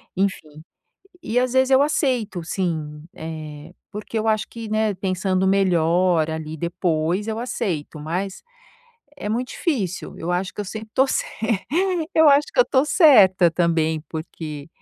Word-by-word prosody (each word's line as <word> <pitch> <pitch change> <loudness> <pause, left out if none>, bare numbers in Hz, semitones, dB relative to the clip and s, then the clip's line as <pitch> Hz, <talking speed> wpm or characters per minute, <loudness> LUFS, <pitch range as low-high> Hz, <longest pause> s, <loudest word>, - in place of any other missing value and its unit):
Enfim, 155 -6 -2 0.6
e 240 +3 0
às 250 0 +1
vezes 260 0 +3
eu 265 +1 +6
aceito 250 - 0
sim, 155 -5 -3
eh, 155 0 -8 0.2
porque 215 +2 -5
eu 220 - -2
acho 215 -1 +1
que, 230 -1 -8
né, 215 0 +1
pensando 185 0 -1
melhor 175 -3 +2
ali 160 0 -5
depois 170 +3 -1
eu 220 0 -2
aceito, 185 -11 -3
mas 180 +6 -4 0.7
é 210 - -5
muito 245 +3 -2
difícil, 215 - -3
eu 165 - -4
acho 180 +1 -1
que - - -5
eu - - -3
sempre 220 +2 -7
estou 265 +3 +3
cer - - 0 0.9
eu 320 -1 +6
acho 285 +1 +5
que - - -8
eu - - +9
estou 265 - +2
certa 205 - +6
também, 165 -2 +1
porque, 155 -2 -7
185 Hz, 155 wpm, -22 LUFS, 160-220 Hz, 0.9 s, eu